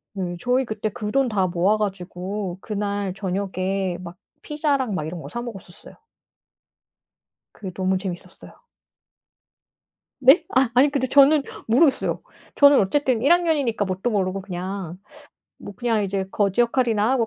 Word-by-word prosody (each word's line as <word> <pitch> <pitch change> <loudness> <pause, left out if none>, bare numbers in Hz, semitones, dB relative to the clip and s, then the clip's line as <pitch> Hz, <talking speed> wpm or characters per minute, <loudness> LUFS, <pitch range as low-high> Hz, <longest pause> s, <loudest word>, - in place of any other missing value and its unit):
예 175 -2 -4
저희 250 +2 +1
그때 215 -1 -3
그 210 0 -5
돈 275 -2 +2
다 195 -4 +1
모아 180 +4 +1
가지고 190 -1 -4
그날 205 -2 -3
저녁에 190 -1 -2
막 175 0 -9 0.2
피자랑 285 -7 -1
막 155 -4 -3
이런 170 +1 -6
거 - - -9
사 240 - -5
먹었었어요. 195 -7 -10 1.6
그게 190 -3 -8
너무 190 0 0
재밌었어요. 185 -2 -9 1.6
네? 270 +6 +6
아 260 -3 +4
아니 275 +4 +5
근데 275 -2 0
저는 285 +3 +5 0.2
모르겠어요. 265 +6 +2 0.4
저는 285 -1 +7
어쨌든 250 +3 +1
1 280 +6 +5
학년이니까 300 -11 +1
뭣도 190 +6 -2
모르고 195 -2 -1
그냥 185 -1 -6 0.6
뭐 - - -9
그냥 230 -3 0
이제 195 -1 -2
거지 200 +2 +1
역할이나 235 -2 +2
하고 255 -4 +1
205 Hz, 290 characters per minute, -23 LUFS, 190-255 Hz, 1.6 s, 저는